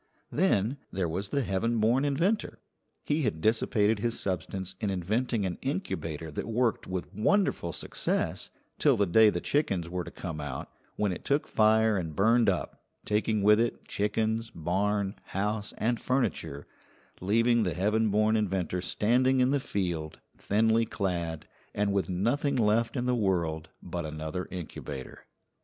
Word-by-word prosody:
Then 140 - +2
there 90 -2 -1
was 95 +5 -3
the 140 +4 0
heaven 115 +3 0
born 120 +6 +3
inventor. 170 +10 0 0.5
He 150 +2 0
had 110 - -1
dissipated 110 +1 +2
his 115 +2 0
substance 95 +1 -3
in 105 - 0
inventing 105 +4 0
an 90 -2 -3
incubator 80 - -3
that 75 - -4
worked 115 -1 0
with 90 0 -4
wonderful 110 - +1
success - - -2 0.3
till - - +4
the 100 - +3
day 110 +4 +6
the 90 - -1
chickens 100 - 0
were 90 0 -2
to 85 - -8
come 85 -4 -6
out, 65 -2 -5 0.2
when 105 -2 0
it 90 - -6
took 140 +2 +1
fire 110 0 +4
and 80 -4 -4
burned 115 +4 +4
up, - - -3 0.2
taking 105 0 +1
with 105 +1 +6
it 120 0 -1
chickens, 110 +2 -1
barn, 100 +4 -1
house, 105 +2 -2
and 120 +1 0
furniture, 125 - -1 0.5
leaving 115 +5 +3
the 90 -5 0
heaven 105 +4 +2
born 110 +2 +3
inventor 95 -4 -1
standing 125 +8 +2
in 125 +1 +3
the 145 - +2
field, 85 -10 -3 0.2
thinly 110 +2 +2
clad, 85 -6 -3 0.3
and 100 -1 +1
with 100 -1 0
nothing 120 +11 0
left 115 +2 +2
in 125 - -1
the 125 - +2
world 85 -8 0
but 85 -3 -4
another 80 +4 -4
incubator. 75 -6 -7
105 Hz, 155 wpm, -29 LUFS, 90-115 Hz, 0.5 s, day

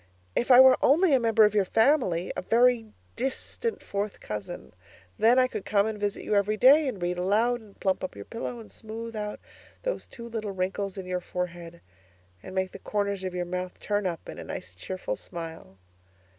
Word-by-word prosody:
If 240 - 0
I 250 -1 +9
were 260 0 +8
only 320 +3 +5
a 265 - +5
member 225 -2 +5
of 210 - +2
your 205 -2 +3
family 220 - +2
(a - - -2
very 235 +2 +3 0.3
distant 270 - -3
fourth 200 0 -3
cousin) 100 -11 -7 0.5
then 235 +3 +5
I 255 - +6
could 230 -6 -5
come 200 -1 +2
and 220 -1 -3
visit 205 -1 -2
you - - -2
every 205 +1 +2
day, 280 +6 +6
and 230 -7 -3
read 175 0 -2
aloud 225 +6 +2
and 210 -2 -18
plump 190 -1 0
up 185 - -4
your 100 0 -8
pillow 240 +1 -5
and 225 - -12
smooth 225 +1 -7
out 210 -1 -4 0.4
those - - -3
two 235 -1 -10
little 220 -3 -4
wrinkles 190 +1 -2
in 190 - -5
your 180 0 -2
forehead 175 -1 -5 0.6
and 185 - -9
make 190 0 0
the - - -10
corners 200 -2 -2
of 185 -1 -4
your 180 0 -1
mouth 180 +1 -5
turn 205 -2 -1
up 170 -3 -5
in - - -8
a - - -6
nice 90 - -7
cheerful 180 - -4
smile. 165 - -8
205 Hz, 200 wpm, -27 LUFS, 185-230 Hz, 0.6 s, I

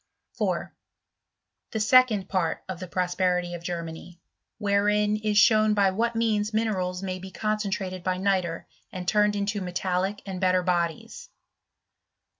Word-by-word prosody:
4. - - -2 1.0
The 220 - -1
second 215 -3 +4
part 185 -4 -1
of 185 -2 -6
the 185 - -6
Prosperity 180 0 0
of 175 - -6
Germany 170 0 -6 0.2
< - - -58
wherein 210 0 +2
is 215 -1 -1
shown 215 -1 +5
by 200 -2 +3
what 230 +4 -1
means 215 -2 0
minerals 190 -5 -1
may 185 -1 -3
W 190 +1 -9
concentrated 200 -3 -2
by 185 0 0
nitre, 185 -3 0 0.3
and 180 -1 -6
turned 210 +1 +3
mto 205 0 -1
metallic 185 +2 -2
and 190 -2 -5
better 185 -1 +3
bodies. 170 -3 -2
190 Hz, 140 wpm, -26 LUFS, 180-210 Hz, 1.0 s, shown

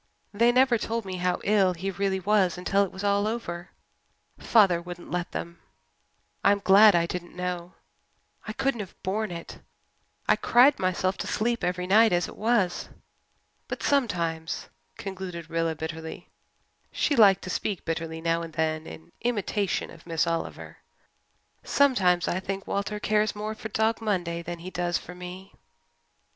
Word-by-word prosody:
"They 235 +4 +4
never 250 -1 +4
told 230 0 -3
me 185 -1 -4
how 180 0 0
ill 200 -3 +3
he 190 +3 -3
really 190 0 -1
was 190 -2 +2
until 195 +2 +2
it 195 - -4
was 190 - -8
all 200 +1 +2
over 180 -7 -4 0.7
father 195 -7 +4
wouldn't 175 0 -9
let 175 -1 -2
them. 170 0 -6 0.8
I'm 200 - +5
glad 200 +1 +7
I 170 -1 +3
didn't 175 0 -6
know 180 -1 -4 0.7
I 215 - -3
couldn't 270 0 0
have 195 -3 -7
borne 210 +3 -1
it. 170 -1 -8 0.7
I - - +4
cried 265 +4 +5
myself 185 +1 0
to - - -3
sleep 235 +2 -1
every 180 0 -1
night 215 +4 +5
as 175 0 +1
it - - -10
was. 210 -5 0 0.8
But - - -5
sometimes," 170 - 0 0.3
concluded 180 -4 -6
Rilla 165 -1 0
bitterly 160 +1 -7 0.6
she 290 - +1
liked 200 -5 +6
to 185 - -4
speak 200 0 -3
bitterly 160 0 -3
now 165 0 +1
and 165 -1 -7
then 155 0 -1
in 80 0 -11
imitation 205 -4 -1
of 165 0 -15
Miss 165 -1 +1
Oliver 165 0 -4 0.9
"sometimes 190 -11 +3
I 175 - 0
think 195 +1 -4
Walter 210 +1 -2
cares 210 0 +1
more 210 +1 -3
for 220 0 -7
Dog 220 +2 +1
Monday 175 -6 -1
than 175 +1 -6
he 185 - -6
does 175 -1 0
for 180 - -10
me." 180 +2 -9
185 Hz, 160 wpm, -27 LUFS, 175-210 Hz, 0.9 s, glad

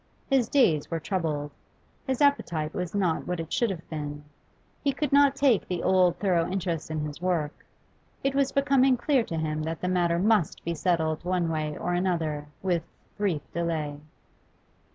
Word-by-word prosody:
His 265 -5 +2
days 165 - +3
were 165 - -2
troubled; 155 -5 -2 0.6
his 260 0 -1
appetite 165 - +1
was 180 +1 -4
not 180 -5 0
what 180 -1 -2
it 165 -1 -5
should 235 - +2
have 175 -4 -6
been; 150 -2 -5 0.6
he 280 - +2
could 285 0 -2
not 280 -1 +6
take 265 -7 +3
the 180 -2 -3
old 185 -2 +4
thorough 175 -5 +1
interest 175 -5 -2
in 155 -1 -2
his 150 +1 -6
work. 170 -5 -2 0.6
It 275 0 +1
was 275 -1 +2
becoming 275 -2 +3
clear 265 0 +2
to 165 - -5
him 155 -1 -1
that 160 +1 -3
the 180 - -2
matter 175 -2 +2
must 205 -3 +2
be 170 - -2
settled 160 -2 0
one 180 -2 0
way 155 -2 -2
or 175 - -2
another 165 -5 -1 0.2
with 180 -3 +1 0.3
brief 185 -8 -1
delay. 155 -4 -2
175 Hz, 175 wpm, -27 LUFS, 155-210 Hz, 0.6 s, not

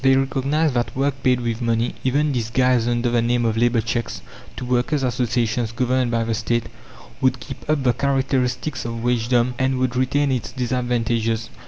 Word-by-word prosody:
They 135 0 +5
recognize 135 +3 +1
that 120 -1 -1
work 135 0 -1
paid 125 -1 +2
with 120 0 -2
money, 115 0 0
even 145 +3 +2
disguised 120 0 +1
under 120 0 0
the 120 -1 +2
name 120 0 +1
of 110 -1 +1
"labour 120 0 +2
cheques," 115 +1 -3 0.3
to 125 - -6
Workers' 125 +4 0
associations 120 -2 0
governed 125 +1 0
by 115 -1 +1
the 115 0 -1
State, 115 +1 -1 0.5
would 130 -1 +2
keep - - -9
up 155 -3 +1
the 125 -2 +3
characteristics 135 0 0
of 115 0 -5
wagedom 120 +1 +1
and 130 0 +1
would 130 -1 0
retain 135 +2 +1
its 125 -3 -2
disadvantages. 120 -3 -1
125 Hz, 175 wpm, -22 LUFS, 115-130 Hz, 0.5 s, They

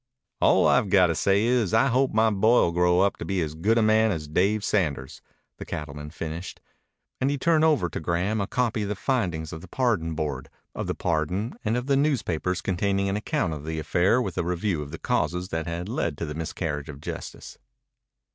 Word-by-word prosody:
"All - - +4
I've 120 -5 +3
got 95 -2 +6
to 85 - -1
say 100 +5 +2
is 120 -4 +2
that 115 +6 +3
I - - +2
hope 130 +2 +2
my 110 +1 +3
boy 110 +4 +4
will 85 - +2
grow 90 +1 +3
up 100 0 +2
to - - -6
be 95 -1 -1
as 75 -1 -4
good 100 +9 +1
a 115 - +4
man 110 +1 +4
as 80 -5 -4
Dave 100 +7 +1
Sanders," 75 -11 -1 0.4
the - - -7
cattleman 75 -1 -6
finished, 80 +2 -6 0.6
and 135 - +1
he 145 - 0
turned 160 +2 +3
over 150 - +3
to 80 - -5
Graham 90 +6 -1
a 100 - -2
copy 120 -3 0
of 100 - -2
the 105 - -1
findings 90 - -1
of 80 - -7
the 95 - -11
Pardon 90 -8 0
Board, 75 -5 -3 0.2
of - - -4
the - - -2
pardon, 90 - -1
and 110 +2 0
of 125 - -3
the 140 0 +2
newspapers 105 - 0
containing 100 +1 0
an 95 - -1
account 105 - -1
of 75 -2 -7
the 80 +1 -4
affair 85 - +2
with 100 -8 -3
a - - +1
review 90 -1 -1
of 70 - -7
the 80 - -7
causes 90 +3 -1
that 80 0 -3
had 85 +2 -4
led 85 - -2
to - - -3
the 75 - -5
miscarriage 80 -2 -4
of 70 -1 -8
justice. - - -8
95 Hz, 220 wpm, -25 LUFS, 80-110 Hz, 0.6 s, got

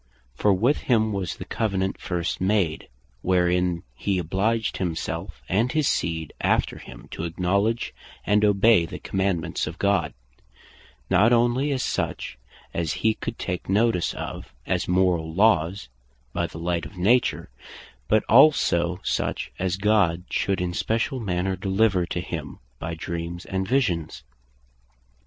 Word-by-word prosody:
For 105 +11 +2
with 115 +10 +2
him 110 -3 +3
was 95 -4 -3
the - - -8
Covenant 95 -4 -1
first 85 -2 -2
made; 95 -5 +1 0.3
wherein 90 -1 +1
he 95 +10 -1
obliged 100 +6 0
himself, 85 0 -4
and 110 +7 +1
his 155 -3 +1
seed 80 -2 -1
after - - +1
him, - - -12
to - - -5
acknowledge 100 +7 0 0.3
and 105 +1 +3
obey 105 -3 +4
the - - -7
commands 95 -5 -1
of 80 +3 -6
God; 100 -6 +1 1.0
not 100 +5 +5
onely 120 +4 +2
such, 95 - -3 0.3
as 85 -2 -1
he 110 - +5
could - - -6
take 90 0 -4
notice 105 -2 +2
of, - - -6
(as - - -1
Morall 90 -3 +2
Laws,) 95 - +2 0.5
by 85 - 0
the 80 - -10
light 85 0 -2
of 100 - -15
Nature; 110 - +2 0.6
but 110 0 +3
also 90 - +5
such, - - -2
as 95 -1 0
God 100 -4 +2
should 100 -1 0
in 90 -1 -1
speciall 115 +8 -1
manner 95 -1 -1
deliver 95 -1 +1
to 90 - -3
him 80 -5 -6 0.2
by 80 +1 -4
Dreams 85 +1 -5
and 95 0 -2
Visions. 95 - 0
95 Hz, 140 wpm, -25 LUFS, 85-110 Hz, 1.0 s, not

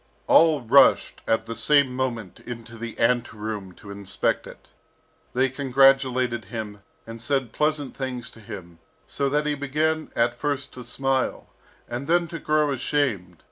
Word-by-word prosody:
All 160 -3 +5
rushed 130 +3 +4
at 110 0 +1
the 115 0 -5
same 130 +2 +3
moment 120 -7 -3
into 115 -1 -9
the 115 0 -7
ante 120 -1 +1
room 105 -3 -5
to 100 +3 -12
inspect 100 -1 -2
it. - - -14 0.6
They 130 +2 +3
congratulated 130 -3 +3
him, 105 0 -6 0.2
and 115 0 -8
said 130 -2 0
pleasant 150 -1 -1
things 130 -3 -5
to - - -16
him, 85 -5 -10 0.3
so 140 -1 -1
that 150 +2 +1
he 150 - +1
began 155 +3 -1
at 120 +1 +2
first 140 +2 -3
to 125 - -8
smile, 135 0 -1 0.4
and 120 +3 -5
then 170 +1 +3
to 165 - -6
grow 150 -1 +1
ashamed. 120 - -1
125 Hz, 155 wpm, -24 LUFS, 115-140 Hz, 0.6 s, All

